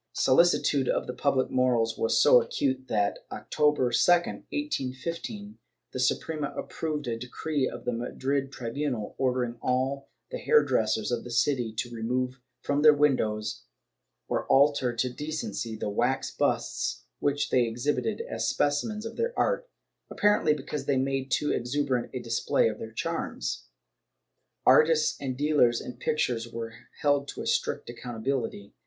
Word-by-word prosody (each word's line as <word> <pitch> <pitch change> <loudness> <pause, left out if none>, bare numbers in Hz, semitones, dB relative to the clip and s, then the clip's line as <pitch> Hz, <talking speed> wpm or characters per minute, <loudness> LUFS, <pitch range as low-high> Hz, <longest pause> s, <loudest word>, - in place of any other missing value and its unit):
Solicitude 140 -2 +3
for - - -1
the 125 - -5
public 130 +1 +1
morals 120 -3 +2
was 115 - +1
so 125 - +7
acute 130 +2 -1
that, 105 -3 0
October 150 -5 +1
2, - - +1 0.2
1815, 175 - -2 0.3
the - - -5
Suprema 145 +3 0
approved 150 -2 -3
a 115 -1 -2
decree 130 +3 -2
of - - -9
the - - 0
Madrid 135 +3 -2
tribunal, 125 -2 -3
ordering 125 -2 0
all 130 +2 -1 0.2
the - - -4
hairdressers 110 - +2
of 120 -1 -1
the - - -9
city 120 -1 +1
to 120 +2 -4
remove 125 +3 -2 0.2
from 145 0 0
their 150 -1 +8
windows, 110 -7 0 0.6
or - - -2
alter 140 -2 +4
to 125 +2 +1
decency, 125 -5 -4
the 105 - -4
wax 120 +6 0
busts - - -1 0.2
which 145 0 0
they 125 -2 +3
exhibited 140 - -1
as - - -2
specimens 210 +10 0
of 225 - -7
their 470 +1 -1
art - - 0 0.2
— - - -52
apparently 205 -7 +3
because 150 +1 -5
they 140 - +1
made 135 0 -1
too 150 +3 +1
exuberant 130 0 -1
a 130 - -4
display 115 -1 +1
of 110 -1 -3
their 110 - -6
charms. 110 - -3 1.0
Artists 155 0 +5
and 130 -2 -3
dealers 145 -5 +3
in^ 125 - -8
pictures 120 -6 -1
were 115 -1 -5 0.3
held 145 -1 +2
to - - -6
a - - -7
strict - - 0
accountability. 120 -3 -4
130 Hz, 150 wpm, -28 LUFS, 120-150 Hz, 1.0 s, their